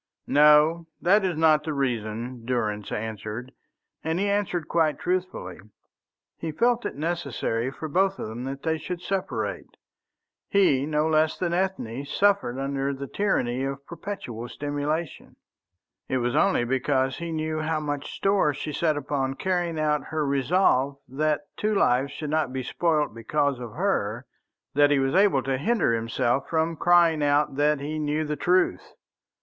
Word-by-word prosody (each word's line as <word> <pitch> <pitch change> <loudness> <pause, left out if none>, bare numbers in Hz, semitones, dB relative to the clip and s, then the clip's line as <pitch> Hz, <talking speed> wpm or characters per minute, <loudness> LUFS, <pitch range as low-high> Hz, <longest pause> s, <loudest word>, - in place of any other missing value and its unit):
"No, 150 +3 +5
that 200 +4 +4
is 180 -4 -1
not 155 -1 +4
the 155 0 -3
reason," 120 -2 -3
Durrance 110 -4 -2
answered, 110 +3 -5 0.5
and 160 +2 -1
he 200 - +1
answered 200 -5 -1
quite 160 -3 +2
truthfully. 180 - -3 0.8
He 165 - -3
felt 240 +7 +1
it - - -7
necessary 140 -7 -2
for 155 +4 -6
both 190 +5 +1
of - - -5
them 115 +3 -6
that 135 +1 -6
they 160 -1 0
should 180 +2 -6
separate. 195 -1 -3 0.7
He, 145 -9 +3
no 150 0 +1
less 155 0 +2
than 170 -2 -1
Ethne, 175 -9 -2
suffered 195 -4 +1
under 135 0 -2
the 140 +1 -6
tyranny 130 -9 0
of 135 0 -4
perpetual 125 - -6
simulation. 145 +2 -3 0.7
It 130 - +1
was 120 -1 -1
only 195 -11 +3
because 130 +1 0
he 170 -1 -4
knew 155 0 -2
how 155 0 -1
much 145 -2 -4
store 195 -7 +1
she 150 +1 -5
set 155 0 +1
upon 135 -2 -2
carrying 175 -2 -1
out 150 -1 +1
her 155 -1 -2
resolve 140 -1 +2
that 150 +3 0 0.2
two 215 0 0
lives 130 -6 +2
should 150 +1 -5
not 155 -4 +1
be 130 0 -3
spoilt 155 -1 0
because 140 +4 0
of 120 -3 -7
her, 130 - -1 0.5
that 145 +1 +5
he 145 - +3
was 135 0 +1
able 190 -9 +4
to 135 +1 -1
hinder 200 - +2
himself 120 +3 0
from 165 0 0
crying 170 -2 +4
out 145 -1 +2
that 150 0 +3
he 150 +2 -4
knew 150 +1 -1
the 150 0 -2
truth. 175 - +1
150 Hz, 160 wpm, -26 LUFS, 130-170 Hz, 0.8 s, No